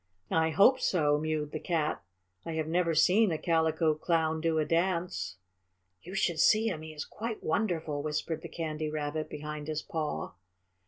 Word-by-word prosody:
"I 160 0 +3
hope 205 - +5
so," 150 -10 +2
mewed 155 -1 -2
the 155 - -4
Cat. 160 -3 -1 0.4
"I 165 - -5
have 160 -1 -1
never 165 0 +1
seen 190 +6 +5
a 160 - 0
Calico 160 -1 +2
Clown 160 0 0
do 165 -1 +1
a 155 - +2
dance." 170 - -1 0.6
"You 185 +3 -9
should 170 -4 +1
see 220 +6 +5
him 160 -6 -4
he 160 0 -8
is 150 -2 -6
quite 225 0 -5
wonderful," 160 -5 -1
whispered 155 +1 -2
the - - -8
Candy 155 -2 -3
Rabbit 155 0 -3
behind 150 0 -6
his 155 -1 -2
paw. 155 - -3
160 Hz, 170 wpm, -30 LUFS, 155-170 Hz, 0.6 s, hope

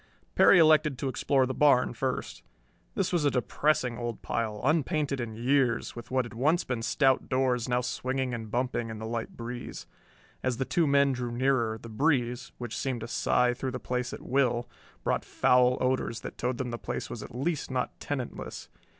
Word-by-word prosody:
Perry 200 - +7
elected 155 -4 +5
to 135 - -2
explore 135 0 +2
the 130 - -3
barn 135 -4 +4
first. 130 +2 -3 0.5
This 190 -1 0
was 170 -3 +2
a 145 - +4
depressing 125 -1 0
old 120 -2 -4
pile, 110 -2 -2
unpainted 150 -1 +1
in 115 -3 -4
years, 125 0 +1
with 120 0 -9
what 130 -1 +1
had 120 - -10
once 150 +9 +2
been 125 -3 -3
stout 130 +4 +2
doors 130 -2 +1
now 125 0 +2
swinging 130 +1 -2
and 115 -2 -5
bumping 120 0 -1
in 110 - -6
the 110 - -6
light 115 0 -4
breeze. 120 +1 -6 0.6
As 130 -2 -1
the 130 - -1
two 165 +2 +1
men 140 0 +4
drew 125 -2 -3
nearer, 120 -3 +1
this 115 +1 -11
breeze 125 -1 0
which 120 -2 -5
seemed 130 -2 -2
to 115 - -5
sigh 125 +1 +2
through 130 +2 -3
the 125 - -4
place 125 0 -2
at - - -8
will 125 -2 +1 0.4
brought - - 0
foul 125 0 +3
odors 130 -2 0
that - - -7
told 125 0 -2
them 125 -1 -3
the 120 - -4
place - - -4
was 115 - -6
at - - -9
least 150 +4 -2
not 130 -1 -2
tenantless. 135 -4 -5
125 Hz, 195 wpm, -29 LUFS, 120-135 Hz, 0.6 s, Perry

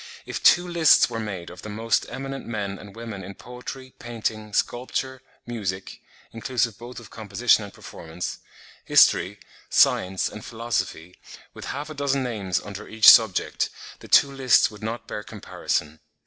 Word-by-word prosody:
If - - -5
two 175 0 +5
lists 170 -3 +5
were 115 - -3
made 95 -6 -6
of - - -11
the 105 - -8
most 110 +2 0
eminent 135 0 -6
men 100 -4 -4
and 100 0 -12
women 115 -4 -7
in 95 +2 -9
poetry, 130 +2 -9
painting, 110 -3 -4
sculpture, 130 +4 -2 0.2
music 100 -6 -5 0.3
(inclusive 115 -1 -2
both 120 +1 -9
of 115 - -14
composition 110 +1 +2
and 100 - -11
performance), 80 -1 -7 0.4
history, 100 +4 +4 0.3
science, 95 0 +3
and 105 - -9
philosophy, 110 -7 -4 0.3
with - - -9
half 145 +3 -5
a - - -5
dozen 140 -2 0
names 100 -7 -2
under 105 +1 -9
each 110 0 +7
subject, 110 -5 +3 0.3
the - - -12
two 140 - +5
lists 135 -4 +4
would 105 - -13
not 110 +2 -5
bear 105 - -5
comparison. 80 -7 -4
110 Hz, 155 wpm, -24 LUFS, 100-125 Hz, 0.4 s, each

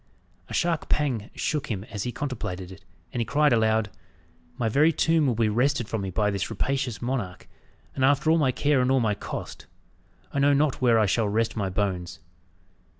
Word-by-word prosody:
A - - -7
sharp 170 -2 0
pang 125 -8 0
shook 150 -3 -2
him 100 -4 -3
as 105 - -4
he 125 - -2
contemplated 95 -10 -5
it, 95 +1 -13 0.3
and 120 - -1
he - - +2
cried 145 +3 +3
aloud, 110 -2 +2 0.7
"My 120 -3 0
very 145 +9 +4
tomb 160 -1 +2
will 120 - +1
be 115 0 +2
wrested 120 +2 +1
from 110 -2 -3
me 95 - -3
by 105 +2 +1
this 100 -1 -2
rapacious 130 -4 -2
monarch; 115 -8 -3 0.5
and 130 - -2
after 145 +3 +3
all 165 - +4
my 135 -4 +3
care 145 +1 +2
and 125 - +1
all 135 0 +4
my 110 -3 +1
cost, - - -7 0.7
I 140 - 0
know 145 +1 +4
not 145 -1 +1
where 120 -3 +4
I 110 - +4
shall 105 +2 +1
rest 115 +2 0
my 100 -4 -1
bones!" 90 -3 -2
120 Hz, 200 wpm, -26 LUFS, 105-140 Hz, 0.7 s, very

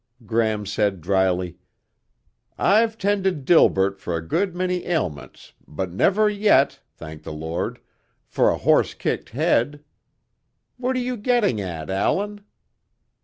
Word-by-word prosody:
Gram 110 -1 0
said 100 -1 0
dryly, 90 0 0 1.0
"I've 220 +2 +3
tended 195 -8 0
Delbert 100 - +4
for 85 - -3
a 80 0 -7
good 185 - 0
many 180 0 -2
ailments 75 - -4
but 90 +4 -4
never 200 - +3
yet, 205 -9 +3 0.2
thank 80 -1 -10
the - - -8
Lord, 80 +2 -4 0.5
for - - +2
a - - 0
horse - - +2
kicked - - -3
head. 145 +5 0 0.9
What 255 +1 -1
are - - 0
you 250 0 -2
getting 215 - +1
at, 85 -3 -5
Allan?" 205 - -1
120 Hz, 125 wpm, -23 LUFS, -, 1.0 s, Delbert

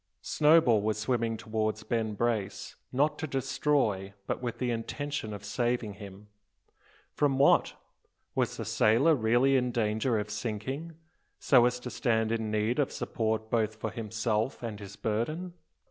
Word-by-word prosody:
Snowball 150 -8 +4
was 110 +1 0
swimming 115 0 0
towards 110 0 -2
Ben 110 -1 -1
Brace, 105 -3 -2 0.2
not 150 +3 +1
to 155 - -3
destroy, 135 -7 0
but - - -3
with 120 -2 -3
the 125 -1 -1
intention 135 +1 -3
of 100 -1 -7
saving 120 0 -1
him. 100 0 -11 0.9
From 140 -2 +1
what? 140 - +4 0.6
Was - - 0
the - - -4
sailor 120 +10 +4
really 125 +2 +3
in 125 -1 +2
danger 110 +1 0
of 105 0 -3
sinking, 120 +9 -4 0.4
so 125 -3 +5
as 125 0 -2
to 125 - -6
stand 110 -2 +1
in 110 -1 -1
need 110 +5 0
of 145 - +1
support 110 -1 -2
both 110 -2 +1
for 110 - -4
himself 110 +1 -2
and 110 -3 -5
his 100 -1 -9
burden? 155 +12 -2
115 Hz, 150 wpm, -29 LUFS, 110-130 Hz, 0.9 s, so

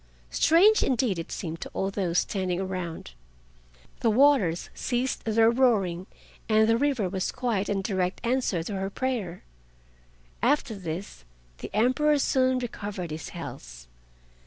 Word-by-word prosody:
Strange 380 - +5
indeed 235 -8 +1
it 165 - -7
seemed 165 -1 -5
to - - -5
all 195 0 -1
those 180 -4 -1
standing 185 -1 -1
round. 180 - -5 0.9
The 230 - +2
waters 225 - +3
ceased 250 +1 -2
their 225 +1 +4
roaring, 205 -8 +1 0.4
and 220 0 +4
the 225 - +4
river 255 -5 +1
was 185 0 -2
quiet 235 -6 -1
in 195 -1 -1
direct 185 -2 -1
answer 235 -9 0
to 200 +3 -4
her 195 0 -2
prayer. 210 -7 -3 1.0
After 280 -4 +1
this 180 - -6 0.4
the - - -6
Emperor 255 +7 +3
soon 260 -2 +2
recovered 205 -8 -5
his 155 0 -6
health. - - -9
205 Hz, 135 wpm, -27 LUFS, 180-255 Hz, 1.0 s, Strange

